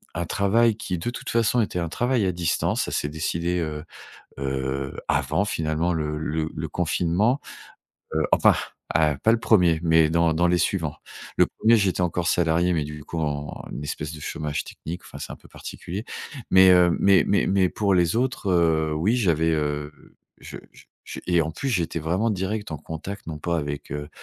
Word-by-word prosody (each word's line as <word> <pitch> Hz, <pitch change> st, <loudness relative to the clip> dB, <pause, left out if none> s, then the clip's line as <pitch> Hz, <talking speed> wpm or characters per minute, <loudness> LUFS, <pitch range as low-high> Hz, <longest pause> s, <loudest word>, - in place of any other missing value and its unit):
un 85 Hz, -, -2 dB
travail 110 Hz, +5 st, +2 dB
qui 95 Hz, -5 st, -3 dB
de 120 Hz, -, -2 dB
toute -, -, -7 dB
façon 115 Hz, +1 st, +2 dB
était 105 Hz, -, -2 dB
un 85 Hz, -1 st, -2 dB
travail 120 Hz, -1 st, +1 dB
à 95 Hz, -, +1 dB
distance. 85 Hz, -1 st, 0 dB
Ça -, -, -5 dB
s'est 75 Hz, -, -1 dB
décidé, 85 Hz, +3 st, -1 dB
heu 75 Hz, -2 st, -3 dB, 0.6 s
heu, 65 Hz, 0 st, -2 dB
avant 100 Hz, -, +1 dB
finalement 80 Hz, -1 st, -1 dB
le 75 Hz, -1 st, -2 dB
le 80 Hz, 0 st, -2 dB
le 80 Hz, +1 st, -3 dB
confinement, 90 Hz, -, +1 dB, 0.7 s
heu, 80 Hz, -1 st, +1 dB
enfin, -, -, +6 dB, 0.4 s
ah, 75 Hz, -1 st, +3 dB
pas 115 Hz, -, +4 dB
le 115 Hz, -, +2 dB
1er 90 Hz, -7 st, +4 dB
mais 80 Hz, -2 st, +4 dB
dans 85 Hz, -1 st, +2 dB
dans 85 Hz, +2 st, +2 dB
les 90 Hz, -, +3 dB
suivants. 85 Hz, -3 st, -1 dB, 0.4 s
Le -, -, +5 dB
1er, 115 Hz, +1 st, +3 dB
j'étais 95 Hz, -3 st, +1 dB
encore 90 Hz, 0 st, -1 dB
salarié 85 Hz, +1 st, +2 dB
mais 80 Hz, -3 st, +1 dB
du 75 Hz, 0 st, -8 dB
coup, 85 Hz, -, -4 dB
en 75 Hz, -1 st, -3 dB
un -, -, -6 dB
espèce 75 Hz, +1 st, -4 dB
de 75 Hz, -, -10 dB
chômage 75 Hz, 0 st, -3 dB
technique, 85 Hz, +3 st, -8 dB
enfin, -, -, -10 dB
c'est -, -, -6 dB
un -, -, -8 dB
peu -, -, -19 dB
particulier 100 Hz, +6 st, -7 dB, 0.5 s
mais 95 Hz, 0 st, +7 dB
heu, 90 Hz, -1 st, +5 dB
mais 100 Hz, -3 st, +5 dB
mais 100 Hz, -, +2 dB
mais 95 Hz, -1 st, +3 dB
pour 100 Hz, 0 st, +1 dB
les 85 Hz, +1 st, +2 dB
autres, 125 Hz, -5 st, 0 dB
heu, 80 Hz, -3 st, +2 dB
oui, 95 Hz, +10 st, +1 dB
j'avais, 80 Hz, -8 st, +2 dB
heu, 75 Hz, -1 st, -1 dB, 0.5 s
je -, -, -9 dB
je -, -, -17 dB, 0.2 s
je -, -, -7 dB
et 85 Hz, -2 st, +4 dB
en 80 Hz, +1 st, -4 dB
plus 135 Hz, -, -4 dB
j'étais 85 Hz, -5 st, -1 dB
vraiment 90 Hz, +9 st, 0 dB
direct 105 Hz, 0 st, -3 dB
en 75 Hz, -, -3 dB
contact 80 Hz, +7 st, -7 dB
non 80 Hz, -2 st, -5 dB
pas 85 Hz, +3 st, -1 dB
avec, 75 Hz, -2 st, -5 dB
heu, 75 Hz, 0 st, -5 dB
85 Hz, 195 wpm, -24 LUFS, 80-95 Hz, 0.7 s, mais